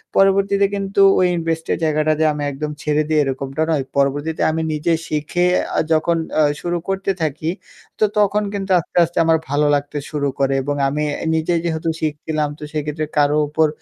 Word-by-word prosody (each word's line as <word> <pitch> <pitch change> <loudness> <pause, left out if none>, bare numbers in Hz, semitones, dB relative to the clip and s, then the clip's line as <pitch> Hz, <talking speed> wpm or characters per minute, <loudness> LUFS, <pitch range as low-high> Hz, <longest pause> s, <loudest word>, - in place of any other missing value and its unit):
পরবর্তীতে 195 +1 +3
কিন্তু 195 0 -2 0.2
ওই 180 - +4
invest 165 -1 -2
এর - - +1
জায়গাটাতে 155 0 +1
আমি 145 0 -4
একদম 150 +2 -4
ছেড়ে 150 0 +1
দিই 155 - +2
এরকমটা 135 +2 -3
নয়। 145 -4 +1
পরবর্তীতে 145 +3 0
আমি 160 +1 -2
নিজে 160 +3 0
শিখে 155 +4 0 0.3
আ - - +4
যখন 165 +1 +2 0.2
আ - - +6 0.2
শুরু 175 0 -1
করতে 195 0 -1
থাকি 155 +1 -2 0.5
তো - - +2 0.2
তখন 210 +1 +2
কিন্তু 195 -1 -3
আস্তে, 165 - -8
আস্তে 170 +1 -4
আমার 160 0 +4
ভালো 145 +1 +2
লাগতে 145 +1 -3
শুরু 145 -2 -1
করে 135 0 +2
এবং 145 +1 -2
আমি 150 +2 -2 0.2
এ - - -4
নিজে 160 +2 0
যেহেতু 160 0 -1
শিখছিলাম 150 0 -2
তো - - -9
সেক্ষেত্রে 150 +1 -2
কারো 145 0 +3
উপর 155 +1 +2
155 Hz, 180 wpm, -19 LUFS, 150-170 Hz, 0.5 s, আ